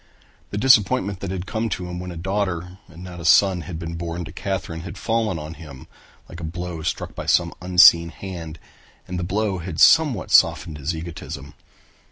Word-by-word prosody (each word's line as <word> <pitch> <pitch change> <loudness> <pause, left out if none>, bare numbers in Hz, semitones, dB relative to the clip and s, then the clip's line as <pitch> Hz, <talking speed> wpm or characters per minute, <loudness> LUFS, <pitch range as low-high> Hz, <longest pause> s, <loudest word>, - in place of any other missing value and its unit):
The 105 - -5
disappointment 105 -4 +3
that 100 - -5
had 95 -1 -4
come 110 +2 -2
to 90 -3 -4
him 90 0 -6
when 90 0 -6
a 85 - -7
daughter 95 -1 -3
and 85 0 -13
not 90 -1 -9
a - - -8
son 90 +1 +4
had 85 0 -7
been 85 0 -6
born 85 +1 -5
to 80 - -9
Katherine 95 -3 -4
had 85 +3 -8
fallen 110 -3 -1
upon 75 +1 -7
him 75 -6 -12 0.4
like 85 - -10
a - - -8
blow 85 0 -5
struck 85 - -3
by - - -7
some 85 -1 +2
unseen 90 -2 +6
hand 85 -3 -8 0.5
and 90 0 -4
the - - -3
blow 100 +1 -1
had 85 -1 -6
somewhat 150 - +5
softened 75 -3 +3
his 75 +4 -2
egotism. 80 -4 -8
90 Hz, 195 wpm, -22 LUFS, 85-95 Hz, 0.5 s, unseen